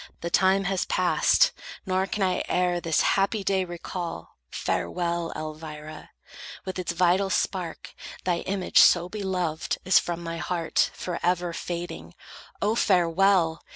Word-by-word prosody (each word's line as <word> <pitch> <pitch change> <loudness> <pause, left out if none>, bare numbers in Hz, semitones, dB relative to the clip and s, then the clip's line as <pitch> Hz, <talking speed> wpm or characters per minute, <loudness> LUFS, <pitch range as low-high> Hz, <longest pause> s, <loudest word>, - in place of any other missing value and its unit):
The 170 - -4
time 190 +1 +3
has 195 -1 -1
passed; - - +3 0.3
Nor 190 0 0
can 205 - -2
I 185 -1 +1
e'er 180 -1 +1
this 165 -2 +1
happy 195 +2 +1
day 190 -1 +1
recall. 175 - -6
Farewell, 170 -1 -2
Elvira! 155 0 -8 0.6
With 190 -1 -4
its 175 -2 -2
vital 180 +3 +2
spark 180 -3 -2 0.3
Thy 175 -2 0
image 190 0 +1
so 175 0 +6
beloved 180 -6 -2
is 185 - +6
from 170 0 -4
my 165 0 -4
heart 170 -2 0
Forever 175 0 -1
fading. 175 +1 -6 0.5
Oh, 210 +2 +2
farewell! 180 -4 +3
180 Hz, 130 wpm, -26 LUFS, 170-190 Hz, 0.6 s, so